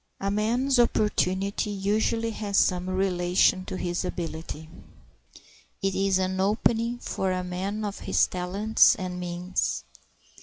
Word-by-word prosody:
A 195 0 -1
man's 240 +6 +1
opportunity 200 -3 +1
usually 215 +3 0
has 205 -2 -2
some 180 0 +2
relation 185 0 +2
to - - -5
his 175 0 -2
ability. 160 -3 -5 1.2
It 195 0 +1
is 195 0 +2
an 190 0 -1
opening 225 +4 +1
for 190 -5 -2
a 185 0 -1
man 195 +4 -3
of 205 -1 -5
his - - +2
talents 195 +7 +3
and 185 -4 -5
means. 180 +1 -2
195 Hz, 125 wpm, -26 LUFS, 180-210 Hz, 1.2 s, talents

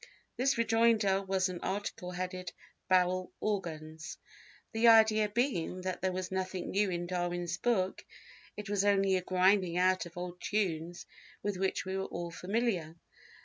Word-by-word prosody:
This 265 +1 +1
rejoinder 225 -4 +3
was 190 -1 0
an 180 -2 -5
article 200 -1 -3
headed 180 0 -4 0.4
"Barrel 185 0 +2
Organs," 160 -6 -4 0.5
the 225 +1 +3
idea 220 -2 +6
being 205 -6 -1
that 185 -1 -4
there 190 0 +1
was 185 0 -4
nothing 185 -1 -3
new 205 0 +2
in 175 -1 -2
Darwin's 175 -1 -2
book, 190 -4 0 0.5
it 210 0 -6
was 200 -1 +1
only 195 -1 +3
a 185 - +1
grinding 185 -1 +2
out 185 0 +2
of 170 - -15
old 180 0 -6
tunes 175 -5 -2 0.4
with 205 -2 -1
which 190 0 -1
we 190 0 -3
were 190 0 -1
all 170 -2 -5
familiar. 185 -4 -1
185 Hz, 150 wpm, -32 LUFS, 180-205 Hz, 0.5 s, idea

